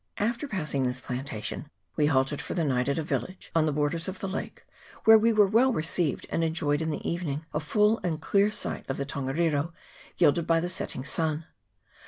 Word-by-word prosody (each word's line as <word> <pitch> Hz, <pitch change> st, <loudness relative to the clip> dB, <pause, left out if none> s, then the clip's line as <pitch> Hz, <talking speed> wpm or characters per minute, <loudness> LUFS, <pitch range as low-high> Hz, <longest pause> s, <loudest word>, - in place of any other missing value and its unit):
After 235 Hz, +7 st, -1 dB
passing 155 Hz, -, -2 dB
this 125 Hz, 0 st, 0 dB
plantation 125 Hz, +1 st, -5 dB, 0.3 s
we 150 Hz, -2 st, +3 dB
halted 135 Hz, 0 st, +1 dB
for -, -, -5 dB
the 170 Hz, -, +1 dB
night 130 Hz, -2 st, +1 dB
at 140 Hz, -, 0 dB
a 160 Hz, -, 0 dB
village 185 Hz, +4 st, -4 dB
on 160 Hz, -1 st, +3 dB
the -, -, +1 dB
borders 150 Hz, +4 st, 0 dB
of 190 Hz, 0 st, -5 dB
the 195 Hz, -, -3 dB
lake, 190 Hz, -, -5 dB, 0.4 s
where 220 Hz, -, +9 dB
we 230 Hz, +2 st, +4 dB
were 215 Hz, -2 st, +5 dB
well 230 Hz, +7 st, +4 dB
received, 160 Hz, -, 0 dB
and 165 Hz, -, +1 dB
enjoyed 160 Hz, -2 st, 0 dB
in 160 Hz, -, -1 dB
the 150 Hz, -, -3 dB
evening 160 Hz, -3 st, -2 dB
a 150 Hz, -, 0 dB
full 210 Hz, +8 st, +2 dB
and. 165 Hz, -4 st, -1 dB
clear 200 Hz, +5 st, +3 dB
sight 210 Hz, -, -3 dB
of 135 Hz, -, -2 dB
the 140 Hz, -, -2 dB
Tongariro 145 Hz, +3 st, -1 dB, 0.4 s
gilded 170 Hz, 0 st, +3 dB
by 165 Hz, 0 st, +4 dB
the 175 Hz, +2 st, -2 dB
setting 155 Hz, -7 st, -3 dB
sun. 155 Hz, +1 st, -1 dB
160 Hz, 205 wpm, -28 LUFS, 145-185 Hz, 0.4 s, where